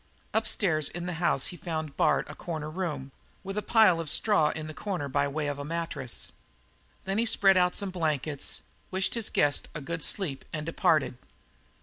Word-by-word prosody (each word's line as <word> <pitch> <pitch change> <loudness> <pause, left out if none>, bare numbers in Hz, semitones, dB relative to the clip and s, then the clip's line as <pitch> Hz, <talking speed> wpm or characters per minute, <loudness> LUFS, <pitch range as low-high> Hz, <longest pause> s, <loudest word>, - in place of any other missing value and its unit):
Upstairs 190 -8 +2
in 175 0 -5
the 180 - -2
house 140 -5 +2
he - - -7
found 160 -5 -4
Bard - - +3
a 150 - -7
corner 155 -2 -5
room 155 -6 -3 0.3
with 195 0 -5
a 210 - 0
pile 215 -7 +5
of 165 -3 -3
straw 155 -1 +4
in 155 0 -4
the 155 - -6
corner 180 -3 -3
by 140 +1 +1
way 150 +2 -2
of 145 -1 -2
a - - -3
mattress. 165 -5 -4 0.7
There 195 0 -1
he 225 +3 +2
spread 195 -3 +5
out 180 -1 +3
some 200 -2 0
blankets, 155 -5 -1 0.3
wished 190 0 0
his 230 -2 -1
guest 145 -1 +2
a - - -2
good 165 +4 -4
sleep, 150 -5 -1
and 150 -1 -3
departed. 160 -6 +2
165 Hz, 190 wpm, -29 LUFS, 150-190 Hz, 0.7 s, pile